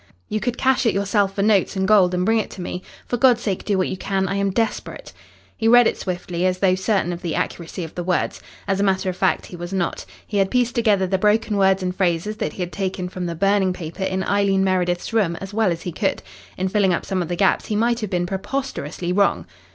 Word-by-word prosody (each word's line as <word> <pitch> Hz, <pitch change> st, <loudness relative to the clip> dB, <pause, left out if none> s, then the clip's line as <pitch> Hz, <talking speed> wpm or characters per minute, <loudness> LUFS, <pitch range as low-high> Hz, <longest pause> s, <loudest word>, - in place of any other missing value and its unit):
You 215 Hz, -, -1 dB
could 245 Hz, +1 st, -2 dB
cash 260 Hz, -2 st, +2 dB
it 205 Hz, -, +2 dB
yourself 200 Hz, 0 st, +1 dB
for 200 Hz, -, 0 dB
notes 205 Hz, -2 st, +2 dB
and 190 Hz, 0 st, 0 dB
gold 190 Hz, -4 st, +5 dB
and 180 Hz, 0 st, 0 dB
bring 225 Hz, +2 st, +3 dB
it 215 Hz, -, -3 dB
to -, -, -6 dB
me. 180 Hz, -, -5 dB, 0.2 s
For 245 Hz, -, -2 dB
God's 240 Hz, -1 st, +4 dB
sake 195 Hz, -5 st, -2 dB
do 205 Hz, -2 st, 0 dB
what 185 Hz, -, +1 dB
you -, -, -3 dB
can. 190 Hz, 0 st, -1 dB
I 190 Hz, -, -2 dB
am 200 Hz, 0 st, 0 dB
desperate." 225 Hz, +4 st, -3 dB, 0.4 s
He 225 Hz, -, 0 dB
read 245 Hz, +1 st, +7 dB
it -, -, +2 dB
swiftly, 180 Hz, -1 st, -4 dB
as 185 Hz, 0 st, 0 dB
though 185 Hz, -1 st, +3 dB
certain 190 Hz, -1 st, 0 dB
of 170 Hz, -, -7 dB
the 170 Hz, -3 st, -3 dB
accuracy 170 Hz, +1 st, -3 dB
of 160 Hz, -, -8 dB
the 175 Hz, -, -4 dB
words. 180 Hz, 0 st, -1 dB, 0.3 s
As 195 Hz, -1 st, 0 dB
a -, -, +2 dB
matter 190 Hz, -1 st, +1 dB
of -, -, -9 dB
fact, -, -, +1 dB
he -, -, -10 dB
was 175 Hz, +1 st, -7 dB
not. 185 Hz, -3 st, -2 dB, 0.2 s
He 210 Hz, -, -3 dB
had 195 Hz, -1 st, +2 dB
pieced 245 Hz, 0 st, +1 dB
together 215 Hz, -6 st, +2 dB
the 190 Hz, 0 st, 0 dB
broken 210 Hz, +1 st, +2 dB
words 190 Hz, -1 st, +3 dB
and 180 Hz, 0 st, -2 dB
phrases 190 Hz, +3 st, 0 dB
that 150 Hz, -, -3 dB
he 185 Hz, -, -3 dB
had 175 Hz, -, -6 dB
taken 185 Hz, -2 st, -3 dB
from 180 Hz, -1 st, -4 dB
the 170 Hz, -, -4 dB
burning 195 Hz, +1 st, +2 dB
paper 170 Hz, +1 st, -8 dB
in 190 Hz, 0 st, -1 dB
Eileen 195 Hz, 0 st, +2 dB
Meredith's 180 Hz, +1 st, 0 dB
room 195 Hz, -7 st, +2 dB
as 195 Hz, +3 st, -8 dB
well 215 Hz, -3 st, +2 dB
as 170 Hz, 0 st, -4 dB
he 180 Hz, -, -4 dB
could. 195 Hz, +4 st, -1 dB, 0.3 s
In 185 Hz, -, 0 dB
filling 190 Hz, -2 st, +2 dB
up -, -, -5 dB
some 190 Hz, -1 st, -1 dB
of 170 Hz, -, -3 dB
the 175 Hz, -, -2 dB
gaps 195 Hz, +2 st, +2 dB
he 215 Hz, -, -1 dB
might 235 Hz, +2 st, +1 dB
have 215 Hz, -4 st, -4 dB
been 175 Hz, -2 st, 0 dB
preposterously 190 Hz, -, -3 dB
wrong. 200 Hz, +1 st, +2 dB
190 Hz, 255 wpm, -22 LUFS, 180-210 Hz, 0.4 s, read